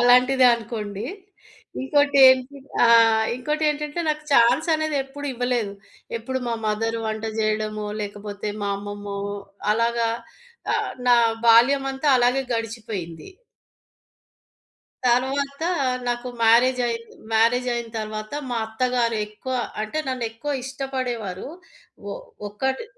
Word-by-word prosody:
అలాంటిదే 250 +2 +5
అనుకోండి. 215 -3 -5 0.8
ఇంకోటేంటి 270 -1 +4 0.3
ఆ! - - +7 0.5
ఇంకోటేంటంటే, 300 +3 -1
నాకు 305 0 -1
ఛాన్సనేది 310 +5 +3
ఎప్పుడూ 285 +2 -8
ఇవ్వలేదు. 245 -4 -1 0.5
ఎప్పుడు 260 +3 -3
మా 235 - 0
మదరు 225 +2 -1
వంట 220 0 -3
జెయడమో, 215 -1 -1 0.2
లేకపోతే 205 0 -5
మా 200 - -1
అమ్మమ్మో, 205 0 -6 0.5
అలాగా 230 +1 +1 0.7
ఆహ్, - - -1 0.2
నా 245 - +7 0.3
బాల్యమంతా 270 +4 +4
అలాగే 245 +2 +3
గడిచిపోయింది. 215 -8 -5 1.8
తర్వాతా 275 +6 +1 0.4
నాకు 240 +1 -2
మ్యారేజయింది. 235 0 +3 0.2
మ్యారేజయిన 235 +1 +2
తర్వాత 215 +1 -5 0.2
మా 240 - -1
అత్తగారు 235 0 0
ఎక్కువ, 215 +5 -6 0.3
అంటే 215 +9 -3
నన్ను 255 -2 -2
ఎక్కువ 235 +6 -4
ఇష్టపడేవారు. 255 -7 -4 0.6
ఒ - - -3 0.4
ఒక్కటి 265 - -2
240 Hz, 95 wpm, -23 LUFS, 220-265 Hz, 1.8 s, ఆ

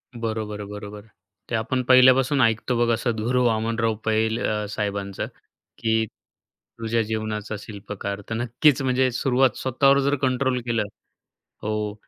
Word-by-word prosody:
बरोबर-बरोबर, 105 -2 -5 0.4
ते 115 - -1
आपण 125 +3 0
पहिल्यापासून 130 +2 +6
ऐकतो 115 +1 +2
बघा 120 0 +3
असं 120 +1 0
सतगुरू 120 +3 0
वामनराव 115 0 +1
पैल 110 +1 +1
अ, 105 0 -1
साहेबांचं, 100 -2 -3 0.5
की 110 0 +1 0.7
तुझ्या 115 0 0
जीवनाचा 110 -1 -3
शिल्पकार 100 -1 -6
तर 115 - -2
नक्कीच 125 +5 +2
म्हणजे 130 0 +2
सुरुवात 130 0 +2
स्वतःवर 135 +2 +3
जर 140 +1 +2
कंट्रोल 130 -1 +1
केलं 115 -2 +1 0.8
हो, 105 -1 -2
115 Hz, 125 wpm, -24 LUFS, 105-125 Hz, 0.8 s, पहिल्यापासून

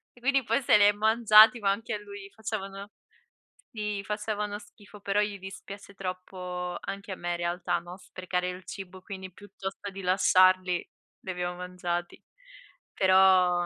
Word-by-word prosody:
E - - -18
quindi 275 +1 +2
poi 275 - +1
se 240 - +5
li 205 - +5
è 205 - +7
mangiati, 220 +2 +6
ma 200 -2 +2
anche 215 +3 -3
a - - -1
lui 200 -1 -10
gli - - -12
facevano 200 -2 -6 0.8
si. 210 -2 -3
Facevano 210 0 -3
schifo, 205 0 -16
però 200 +1 0
gli 205 -1 -2
dispiace 195 +1 -10
troppo 180 -1 -5
anche 200 0 -7
a - - -3
me 175 0 -3
in 175 - -1
realtà, 175 +1 -1
no, 175 +1 -10
sprecare 180 -1 -3
il 180 +1 -7
cibo, 185 0 -9
quindi 190 -1 -8
piuttosto 195 +1 -8
di 195 0 -8
lasciarli 185 -1 +3 0.3
li 185 - -6
abbiamo 180 0 -3
mangiati. 180 -1 -4 0.7
Però 185 -2 +4
195 Hz, 165 wpm, -28 LUFS, 180-205 Hz, 0.8 s, è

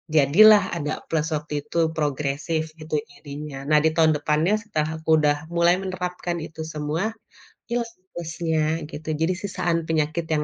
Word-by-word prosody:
jadilah 205 +9 +7
ada 150 +1 -2 0.2
plus 160 -1 0
waktu 150 0 -5
itu 150 +3 -6 0.2
progresif 150 +2 -1 0.2
itu 155 0 -3 0.2
jadinya. 145 0 -8
Nah, 150 - +6
di - - +6
tahun 160 -1 +5
depannya 155 +6 +2
setelah 155 -8 -2
aku 160 - -8
udah 145 0 +4 0.2
mulai 170 +1 +5
menerapkan 180 -2 -3
itu 160 0 -9
semua, 150 +3 -2 0.7
ilang 235 -1 0
sih 185 - -38
plusnya 165 -1 -2 0.3
gitu, 155 +1 -9
jadi 165 +3 +2
sisaan 175 -3 0
penyakit 160 +1 0
yang 150 -1 +1
160 Hz, 155 wpm, -24 LUFS, 150-175 Hz, 0.7 s, jadilah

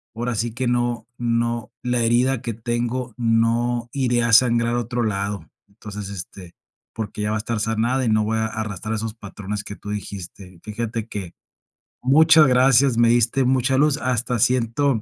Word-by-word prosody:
ahora 120 +1 -2
sí 115 +1 -2
que 125 +1 -2
no 120 -2 -1
no, 115 -1 -1
la 125 -1 0
herida 120 +2 +2
que 115 - -3
tengo, 120 +2 -3
no 115 +1 +1
iría 120 -3 +1
a 115 - +1
sangrar 120 0 +4
a - - +1
otro 120 +1 -2
lado. 100 -1 -3 0.2
Entonces, 105 -1 -8
este, 90 -1 -9 0.4
porque, 105 -1 -5
ya 105 - -1
va - - 0
a - - -2
estar 115 0 -3
sanada 115 +4 0
y - - +1
no 110 0 +3
voy 110 +1 -1
a 110 - 0
arrastrar 110 -1 -4
esos 110 0 -4
patrones 105 -1 -6
que 100 - -7
tú 105 - -10
dijiste. 95 -3 -7
Fíjate 115 +1 -4
que 95 -5 -6 0.7
muchas 155 +3 +6
gracias, 130 0 +4
me 120 0 +5
diste 120 +3 +2
mucha 130 +1 +2
luz, 145 0 +3
hasta 125 -1 -1
siento 125 +2 +1
115 Hz, 175 wpm, -22 LUFS, 105-125 Hz, 0.7 s, muchas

